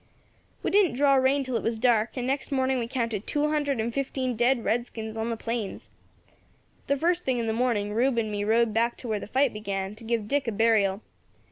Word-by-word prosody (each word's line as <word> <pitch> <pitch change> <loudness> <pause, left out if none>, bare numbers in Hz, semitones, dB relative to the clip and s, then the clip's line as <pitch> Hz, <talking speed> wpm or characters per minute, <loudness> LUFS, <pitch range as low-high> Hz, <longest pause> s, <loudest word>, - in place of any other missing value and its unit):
"We - - 0
didn't 395 -9 +4
draw 280 +1 +4
rein 270 +1 +3
till 255 -2 -4
it - - -3
was 225 0 -1
dark, 235 0 +2
and 250 - -2
next 270 +3 -2
morning 265 -1 +1
we 230 - -2
counted 230 -4 -3
two 295 0 +1
hundred 290 -4 0
and 230 +1 -1
fifteen 260 -2 -2
dead 240 +1 +2
redskins 225 -2 -2
on 225 +1 -2
the 230 - -2
plains. 230 -3 -4 1.0
The 280 - +1
first 345 +4 +1
thing 260 -2 0
in 235 - -1
the 220 - 0
morning, 225 -4 0
Rube 245 +3 +2
and 220 -2 0
me 205 0 -2
rode 225 +1 +2
back 230 +2 +1
to 250 - -8
where 215 -2 -1
the - - -8
fight 265 +3 +2
began, 200 -2 -4
to 220 +2 -12
give 225 -2 -1
Dick 280 +1 0
a - - +1
burial. 210 -2 +2
235 Hz, 225 wpm, -27 LUFS, 220-265 Hz, 1.0 s, didn't